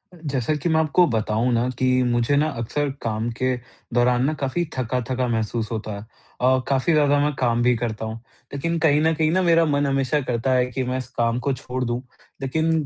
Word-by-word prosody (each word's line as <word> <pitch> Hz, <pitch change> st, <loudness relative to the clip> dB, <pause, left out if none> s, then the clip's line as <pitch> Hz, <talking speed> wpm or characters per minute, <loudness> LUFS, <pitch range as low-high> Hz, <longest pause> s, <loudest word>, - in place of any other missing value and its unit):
जैसा 145 Hz, -4 st, -2 dB
कि 150 Hz, +3 st, -2 dB
मैं 160 Hz, -1 st, +3 dB
आपको 160 Hz, +3 st, +4 dB
बताऊँ 110 Hz, 0 st, 0 dB
ना 120 Hz, +2 st, +1 dB
कि 130 Hz, -, +2 dB, 0.2 s
मुझे 120 Hz, +2 st, +1 dB
ना 150 Hz, +2 st, +3 dB
अक्सर 145 Hz, +5 st, -1 dB
काम 110 Hz, 0 st, -2 dB
के 130 Hz, 0 st, +1 dB, 0.4 s
दौरान 125 Hz, +1 st, +3 dB
ना 155 Hz, -, +1 dB
काफ़ी 140 Hz, +6 st, 0 dB
थका-थका 125 Hz, +1 st, -1 dB
महसूस 115 Hz, -1 st, -2 dB
होता 110 Hz, -1 st, -4 dB
है 100 Hz, -, -7 dB, 0.4 s
अ, 130 Hz, +1 st, +4 dB
काफ़ी 135 Hz, +4 st, +2 dB
ज़्यादा 145 Hz, -2 st, +4 dB
मैं 145 Hz, +1 st, +1 dB
काम 120 Hz, -2 st, +2 dB
भी 125 Hz, 0 st, +4 dB
करता 110 Hz, -2 st, -3 dB
हूँ, 110 Hz, 0 st, -4 dB, 0.4 s
लेकिन 165 Hz, +4 st, -1 dB
कहीं 150 Hz, -2 st, +3 dB
न 160 Hz, +1 st, +3 dB
कहीं 155 Hz, 0 st, +2 dB
ना 185 Hz, +2 st, +2 dB
मेरा 165 Hz, -2 st, +4 dB
मन 145 Hz, -2 st, +1 dB
हमेशा 135 Hz, +1 st, +1 dB
करता 125 Hz, 0 st, -1 dB
है 125 Hz, -1 st, +3 dB
कि 130 Hz, +2 st, -2 dB
मैं 125 Hz, +1 st, -2 dB
इस 130 Hz, -2 st, -5 dB
काम 115 Hz, 0 st, +1 dB
को 135 Hz, +2 st, -1 dB
छोड़ 130 Hz, 0 st, -4 dB
दूँ। 120 Hz, +1 st, -2 dB, 0.4 s
लेकिन 160 Hz, +3 st, 0 dB
130 Hz, 210 wpm, -23 LUFS, 120-150 Hz, 0.4 s, आपको